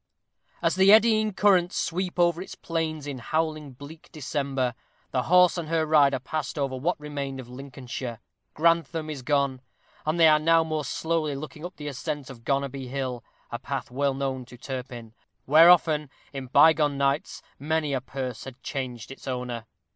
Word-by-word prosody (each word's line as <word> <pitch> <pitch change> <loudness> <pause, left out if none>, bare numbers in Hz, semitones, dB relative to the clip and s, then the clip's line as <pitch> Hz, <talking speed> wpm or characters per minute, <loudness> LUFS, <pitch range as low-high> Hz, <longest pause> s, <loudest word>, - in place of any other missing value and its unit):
_ - - -53 0.2
As - - +3
the 190 +1 +6
eddying 215 0 +5
currents 185 -3 +3
sweep 180 +2 -2
over 175 -1 +3
its 190 - -8
plains 160 -3 -3
in 140 -3 -5
howling, 155 +1 -2
bleak 145 +5 -12
December, 135 -4 -2 0.4
the 130 - +1
horse 180 0 +5
and 160 -2 -5
her 165 -1 +1
rider 145 -3 +4
passed 145 +3 -4
over 135 -2 -1
what 150 +7 -1
remained 140 -2 -5
of 130 - -8
Lincolnshire. 125 -2 -7 0.4
Grantham 165 -1 +1
is 140 -3 -6
gone, 140 -1 0 0.4
and 155 +3 -1
they 165 - +8
are 155 -1 +6
now 165 +1 +4
more 155 -2 -3
slowly 160 -3 -1
looking 155 +2 -8
up 180 +2 -7
the 150 - -7
ascent 140 0 -4
of 115 -3 -13
Gonerby 135 0 -2
Hill, 130 -2 -4 0.3
a - - -4
path - - -5
well 140 +1 0
known 135 -1 -2
to 125 0 -14
Turpin; 125 -3 -7 0.3
where 160 +5 +7
often, 155 -4 +4 0.2
in 135 -2 -6
bygone 150 +1 +5
nights, 140 +2 -1 0.2
many 155 0 -1
a 130 - 0
purse 130 -3 -5
had 130 -1 -10
changed 125 -4 -5
its 135 - -11
owner. 125 -3 -4
145 Hz, 175 wpm, -26 LUFS, 130-160 Hz, 0.4 s, they